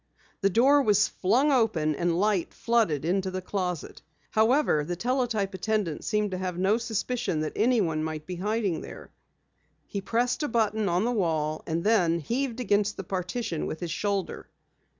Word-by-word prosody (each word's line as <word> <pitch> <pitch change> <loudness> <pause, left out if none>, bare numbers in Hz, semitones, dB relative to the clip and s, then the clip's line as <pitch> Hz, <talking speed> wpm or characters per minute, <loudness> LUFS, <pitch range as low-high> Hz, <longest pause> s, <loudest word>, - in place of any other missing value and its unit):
The 195 - +3
door 270 +8 +5
was 210 -4 +3
flung 250 +10 +2
open 215 - +2
and 170 +2 0
light 205 -3 0
flooded 215 - +1
into 190 +2 0
the 185 0 -3
closet. 180 -3 -4 0.3
However, 220 - +3
the 175 +4 -3
teletype 230 -2 -1
attendant 190 -4 -1
seemed 210 -2 0
to 185 - -3
have 180 -2 -3
no 195 +5 +2
suspicion 235 -5 -2
that 155 - -3
anyone 205 -10 +2
might 155 -1 -4
be 180 +1 -6
hiding 205 -2 -1
there. - - -10 0.7
He 200 - -5
pressed 240 +8 0
a 295 - 0
button 220 -3 +1
on 175 +5 +1
the 245 - +1
wall 160 -8 0
and 165 +1 -1
then 180 -6 +3
heaved 245 - -2
against 210 -3 +1
the 195 - -4
partition 180 0 -3
with 155 - -5
his 175 -2 -4
shoulder. 200 +1 -2
200 Hz, 170 wpm, -27 LUFS, 175-230 Hz, 0.7 s, door